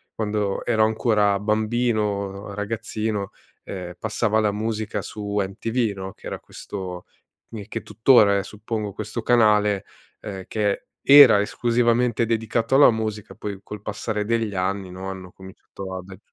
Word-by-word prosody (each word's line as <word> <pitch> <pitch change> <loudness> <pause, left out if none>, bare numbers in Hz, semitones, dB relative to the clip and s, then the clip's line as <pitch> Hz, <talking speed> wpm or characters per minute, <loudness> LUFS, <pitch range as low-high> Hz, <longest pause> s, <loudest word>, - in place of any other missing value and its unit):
quando 105 -2 -2
ero 110 -2 +3
ancora 105 -3 +2
bambino, 105 -2 -1
ragazzino, 105 -1 -3 0.3
ehm, 90 -2 -6
passava 110 0 0
la 105 -1 +2
musica 110 +1 -3
su 105 -1 -5
MTV, 110 +3 -1
no, 95 0 -7
che - - -18
era - - -5
questo 90 -3 -7 0.4
mi 105 -3 -8
che 115 -1 -5
tuttora 105 -1 +5
è, - - -3
suppongo, 105 +1 -5
questo 110 +4 -5
canale, 105 -4 +3 0.4
ehm, 95 -2 -7
che 105 -2 -1 0.2
era 140 -7 +9
esclusivamente 120 +1 +1
dedicato 115 +2 0
alla 140 -2 +8
musica 110 -2 -4
poi 100 -2 -6
col 105 -1 -8
passare 105 0 -3
degli 115 -1 0
anni, 95 0 -2
no, 95 +1 -6
hanno 95 -1 -8
cominciato 95 0 -10
ad 95 +1 -8
agg 95 - -11
105 Hz, 145 wpm, -23 LUFS, 100-115 Hz, 0.4 s, era